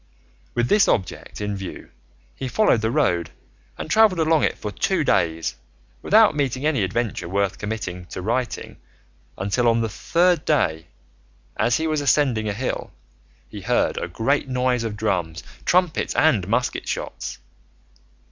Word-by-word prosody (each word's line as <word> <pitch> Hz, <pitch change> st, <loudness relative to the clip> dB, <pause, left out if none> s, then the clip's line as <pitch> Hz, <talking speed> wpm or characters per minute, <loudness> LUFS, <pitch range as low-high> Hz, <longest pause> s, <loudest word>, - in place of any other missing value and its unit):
With 120 Hz, 0 st, +1 dB
this 205 Hz, +6 st, +4 dB
object 95 Hz, 0 st, -2 dB
in 105 Hz, 0 st, -2 dB
view 95 Hz, -1 st, -8 dB, 0.4 s
he 130 Hz, -, -5 dB
followed 125 Hz, -, +3 dB
the 110 Hz, -, 0 dB
road 90 Hz, -, +1 dB, 0.5 s
and -, -, -5 dB
travelled 210 Hz, 0 st, +4 dB
along 160 Hz, -1 st, +3 dB
it -, -, 0 dB
for 105 Hz, -, -5 dB
two -, -, 0 dB
days, 80 Hz, -4 st, 0 dB, 0.4 s
without 215 Hz, -5 st, +5 dB
meeting 135 Hz, -1 st, -1 dB
any 150 Hz, -7 st, +2 dB
adventure 95 Hz, -1 st, -2 dB
worth 100 Hz, 0 st, -1 dB
committing 95 Hz, -4 st, -5 dB
to -, -, -7 dB
writing 120 Hz, +4 st, -2 dB, 0.6 s
until 100 Hz, +6 st, 0 dB
on 115 Hz, 0 st, +3 dB
the 115 Hz, -, -1 dB
third 175 Hz, -, +1 dB
day, 80 Hz, -, +1 dB, 0.7 s
as 120 Hz, +2 st, +2 dB
he 160 Hz, -, -2 dB
was 155 Hz, -2 st, 0 dB
ascending 125 Hz, -6 st, +2 dB
a -, -, -1 dB
hill, 125 Hz, +6 st, -3 dB, 0.6 s
he -, -, -9 dB
heard -, -, +1 dB
a -, -, -3 dB
great 135 Hz, +4 st, 0 dB
noise 125 Hz, -1 st, +1 dB
of 110 Hz, -2 st, -4 dB
drums, 85 Hz, -6 st, -2 dB, 0.2 s
trumpets, 180 Hz, -3 st, +1 dB
and 115 Hz, -, +3 dB
musket 120 Hz, +4 st, -1 dB
shots. -, -, -4 dB
120 Hz, 150 wpm, -23 LUFS, 100-150 Hz, 0.7 s, without